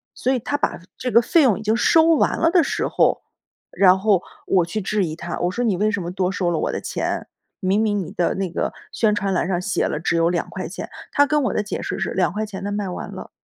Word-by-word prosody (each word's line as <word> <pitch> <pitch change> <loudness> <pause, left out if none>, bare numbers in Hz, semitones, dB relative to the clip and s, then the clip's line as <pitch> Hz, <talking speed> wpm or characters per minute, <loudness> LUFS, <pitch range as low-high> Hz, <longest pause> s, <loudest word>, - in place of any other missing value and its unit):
所 260 - 0
以 255 - 0
他 290 +5 -2
把 - - -1 0.2
这 250 - -3
个 235 - +6
费 315 +5 +3
用 220 -6 +3
已 - - -8
经 220 +1 +2
收 320 +7 +5
完 - - +1
了 330 - +4
的 350 -2 +5
时 - - -1
候， - - +2 0.5
然 185 -1 +5
后 200 -3 +3 0.2
我 185 -2 +3
去 170 +6 -3
质 205 0 0
疑 155 -2 -4
他， 175 +1 -5
我 175 - +1
说： 240 +6 -1
“你 210 -5 +2
为 210 +4 +1
什 215 -3 -2
么 175 - -4
多 185 0 -1
收 185 -2 -1
了 165 - 0
我 - - -1
的 - - -3
钱？ - - -3 0.3
明 195 +2 +1
明 210 -2 +1
你 185 - -5
的 175 - 0
那 190 -2 -2
个 - - -2 0.2
宣 215 -2 +2
传 195 -1 -1
栏 180 - 0
上 180 -2 0
写 185 +1 -1
了 150 - -2
只 170 - 0
有 165 0 +3
2 175 -1 -1
块 - - -5
钱。” - - -6 0.2
他 285 - +4
跟 300 +1 +1
我 - - 0
的 210 - 0
解 210 - -4
释 - - -4
是 - - -2
2 - - +1
块 215 +1 -2
钱 195 -3 -8
的 205 - -3
卖 205 -1 -2
完 180 - -6
了。 - - -8
200 Hz, 285 characters per minute, -22 LUFS, 180-225 Hz, 0.5 s, 个